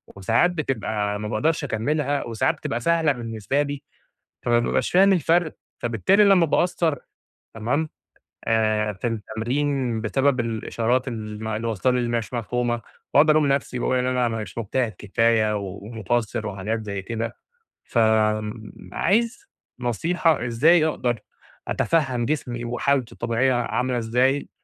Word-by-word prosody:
وساعات 115 - +2
بتبقى 110 - -2
ما 105 - -4
باقدرش 150 +9 0
اكملها، 145 +3 -1
وساعات 115 -2 0
بتبقى 120 - -3
سهلة 165 +3 +2
بالنسبة 120 +2 -2
لي، 145 -1 -3 0.6
فما 120 -1 +3
بابقاش 120 - 0
فاهم 195 +2 +6
الفرق، 170 -1 +2 0.2
فبالتالي 120 - +3
لما 195 -4 +5
باقصّر 165 -1 +1 0.6
تمام 125 +8 -1 0.6
إيه 110 -1 +2
في 100 +5 -3
التمرين، 120 +3 -1
بسبب 130 +4 +1
الإشارات 115 +2 -1
الم 110 -2 -5
اللي 110 +1 -2
وصلة 115 +3 +1
لي، 125 - +1
اللي 120 -1 -1
مش 115 +1 -5
مفهومة، 120 0 -1 0.3
واقعُد 150 +3 +6
الوم 155 -1 +4
نفسي، 135 -2 0
واقول 130 - +1
إن 125 - 0
أنا 125 -1 +1
ما 115 -1 -2
مش 95 +1 -11
مجتهد 115 +1 -1
كفاية 110 +1 +2
ومقصّر 110 +3 -3
وحاجات 105 +3 -3
زي 100 -1 -4
كده، 115 +3 -4 0.5
فآمم، 110 -1 +1 0.2
عايز 230 - +1 0.3
نصيحة، 155 - +1
إزاي 155 +8 +4
أقدر 120 -6 -1 0.5
أتفهّم 135 -7 +1
جسمي، 120 -4 -2
وحالتة 125 +1 0
الطبيعية 120 +3 +1
عاملة 125 +1 0
ازاي 125 +5 +1
120 Hz, 135 wpm, -23 LUFS, 110-145 Hz, 0.6 s, فاهم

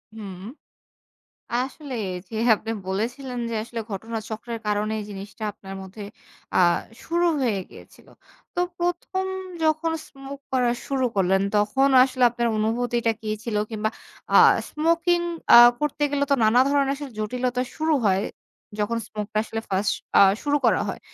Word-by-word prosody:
হুম। 195 -4 -8 1.1
আসলে 265 +2 -3 0.4
যে - - -8 0.2
আপনি 225 +2 -6 0.2
বলেছিলেন 245 +6 -3
যে - - -3
আসলে 230 0 -6
ঘটনা 225 +3 -4
চক্রের 230 +1 -5
কারণে 210 +1 0
জিনিসটা 200 +2 -9
আপনার 195 -1 -10
মধ্যে 190 +3 -10 0.5
আ - - +3 0.5
শুরু 345 +1 +1
হয়ে 225 -6 +1
গিয়েছিল। - - -16 0.5
তো 355 - 0 0.2
১ম 355 +2 -1 0.4
যখন 315 +1 +1 0.2
স্মোক 275 0 -9
করা 250 -2 +2 0.2
শুরু 270 -2 0
করলেন, 190 0 +3
তখন 215 +7 +3
আসলে 255 -1 0
আপনার 235 0 -1
অনুভূতিটা 235 +1 0
কি 215 - -6 0.2
ছিল? 225 -3 -2
কিংবা 215 0 -1 0.4
আ - - +6 0.3
স্মোকিং 335 +3 +2 0.3
আ - - +12 0.2
করতে 295 0 -2
গেলে 285 0 +1
তো - - +6
নানা 230 +4 +5
ধরনের 280 -1 +2
আসলে 285 -1 -7
জটিলতা 250 +3 -1
শুরু 315 0 +1
হয়। 190 +1 +2 0.6
যখন 230 +3 0
স্মোকটা 215 0 -4
আসলে 225 0 -4
1st 195 +2 +1 0.3
আ - - +8 0.2
শুরু 290 0 +1
করা - - +4
হয়। - - -5
240 Hz, 145 wpm, -24 LUFS, 215-280 Hz, 1.1 s, আ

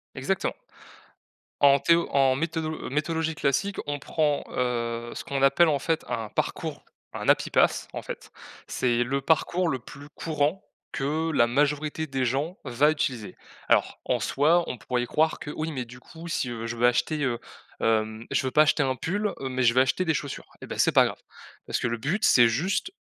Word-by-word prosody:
Exactement. - - -1 1.1
En 140 0 +6
théo 170 +3 +3
en 135 -2 +4
méthodolo 160 +1 -3
méthodologie 160 +3 -1
classique, 150 +9 0
on 145 - -1
prend, 150 0 0
heu, 120 -1 -2
ce - - -5
qu'on 140 -1 -3
appelle, 160 +5 +5
en 145 -2 +1
fait, 160 +3 -1
un 110 -2 -2
parcours, - - -3 0.3
un - - -2
happy - - +3
path - - +2
en - - -4
fait, - - -8 0.4
c'est 120 -1 +1
le 135 +3 -1
parcours 170 +4 +1
le 130 - -1
plus 145 +4 -12
courant 155 +3 -1 0.3
que 155 +4 -1
la 120 -5 +4
majorité 150 +4 0
des 135 -2 -1
gens 140 - -1
va 140 +4 +3
utiliser. 130 -8 -3 0.3
Alors, - - +2
en - - +1
soi, 160 +5 +3
on 125 - -4
pourrait 125 +2 -2
y - - -2
croire 155 +5 +1
que, 145 - -7
oui, 155 +1 -3
mais, 130 -3 -3
du 125 +1 -13
coup, 165 +5 -11
si, 130 -6 -1
heu, 115 -1 -5
je 115 - -4
veux 120 +1 +4
acheter, 145 +5 +1
heu, 120 -3 0 0.4
hem, 110 0 0
je - - +1
veux 130 - -1
pas 150 - +5
acheter 155 0 +2
un 130 -1 0
pull, 205 +9 -1
heu, 135 - -4
mais 130 0 -1
je 115 -1 +5
veux 130 - +5
acheter 135 +7 +1
des 160 - +2
chaussures 145 -2 -5
et - - -8
bah, - - -6
c'est - - +4
pas - - +6
grave, - - -4 0.5
parce - - -1
que 125 - 0
le 115 - -2
but, 155 - -2
c'est 120 -2 +6
juste 185 - -1
140 Hz, 205 wpm, -26 LUFS, 125-160 Hz, 1.1 s, En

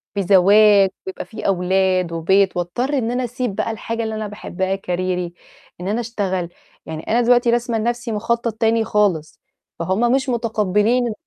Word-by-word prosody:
بزواج 200 +1 +5 0.2
ويبقى 190 - -5
في 220 - -6
أولاد 185 -1 +1
وبيت 190 +3 +2
وأضطر 245 +12 -1
إن 235 -3 -1
أنا 250 +1 -1
أسيب 245 -3 -3
بقى 215 +2 -1
الحاجة 230 +1 -4
اللي 220 0 -3
أنا 215 -1 -4
باحبها 190 -2 -3
كاريري 180 -2 -3 0.5
إن 185 - -4
أنا 215 +4 0
أشتغل. 190 -6 -3 0.4
يعني 160 0 -6
أنا 235 +2 +2
دلوقتي 245 0 +3
راسمة 240 -1 0
لنَفْسي 240 +1 -2
مُخطط 230 +1 -1
تاني 225 0 +1
خالص 190 -9 0 0.4
فهُم 190 +8 +1
مش 265 0 +1
متقبلين 225 0 +1
210 Hz, 155 wpm, -20 LUFS, 185-235 Hz, 0.5 s, بزواج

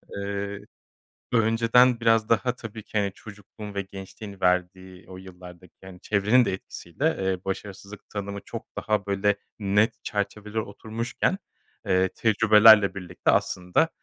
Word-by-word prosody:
Eee, 100 0 -4 0.7
önceden 115 +2 +4
biraz 115 -1 +2
daha 120 +2 +1
tabii 110 -3 -9
ki, 110 - -5
hani, 100 -1 0
çocukluğun 105 0 -11
ve 100 - -2
gençliğin 95 +1 -10
verdiği 90 0 -1
o 95 - -9
yıllardaki, 90 -1 -13
yani, 95 -1 -12
çevrenin 105 +5 +3
de 95 - -1
etkisiyle, 95 - -6
eee, 95 -1 -2
başarısızlık 100 +1 -7
tanımı 100 -1 -5
çok 115 - -7
daha, 105 -2 -1
böyle, 100 +1 +1 0.2
net 105 +2 +1
çerçevelere 105 +1 -3
oturmuşken, 110 - -3 0.5
eee, 95 0 +2
tecrübelerle 110 -1 +6
birlikte 90 -2 -1
aslında 90 - +1
100 Hz, 130 wpm, -25 LUFS, 95-110 Hz, 0.7 s, tecrübelerle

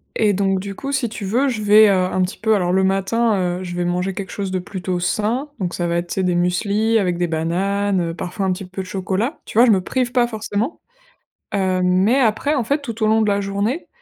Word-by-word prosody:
et 210 -2 +2
donc 195 0 +1
du 195 +1 -6
coup, 275 +6 -5
si 250 -5 0
tu 210 -2 -6
veux 245 +8 +1
je 230 -4 -3
vais, 210 0 +6
heu, - - +4
un 185 0 +1
petit 180 - -4
peu 220 0 +2
alors 180 -3 0
le 190 - +3
matin, 195 +4 +1 0.3
heu, - - -5
je 175 -1 -6
vais 175 0 -1
manger 180 +2 -1
quelque 190 0 -6
chose 195 -2 -4
de 185 - -1
plutôt 180 -1 -4
sain 220 +10 -1
donc 180 -2 -2
ça 175 - -2
va 170 - 0
être, 175 0 -2
tu - - -5
sais, 190 - 0
des 180 -1 +1
mueslis 200 +6 +1
avec 180 -4 0
des 175 - 0
bananes, 185 +4 0
heu, 165 -1 -2
parfois 190 +3 -4
un 185 - +1
petit 190 +1 -7
peu 185 +1 -6
de 185 - -8
chocolat. 195 - -2
Tu - - -7
vois 240 - +8
je 235 - +5
me 190 -3 +3
prive 250 +5 -1
pas 245 -1 +2
forcément. 220 +4 -3 0.7
Hem, 185 -2 +1
mais 190 +8 +3
après 255 +5 +1
en 260 - 0
fait, 285 +6 0
tout 230 -4 -5
au 215 - +3
long 220 +1 +3
de 215 - +1
la 200 0 +1
journée, 200 - -2
200 Hz, 260 wpm, -20 LUFS, 185-220 Hz, 0.7 s, vois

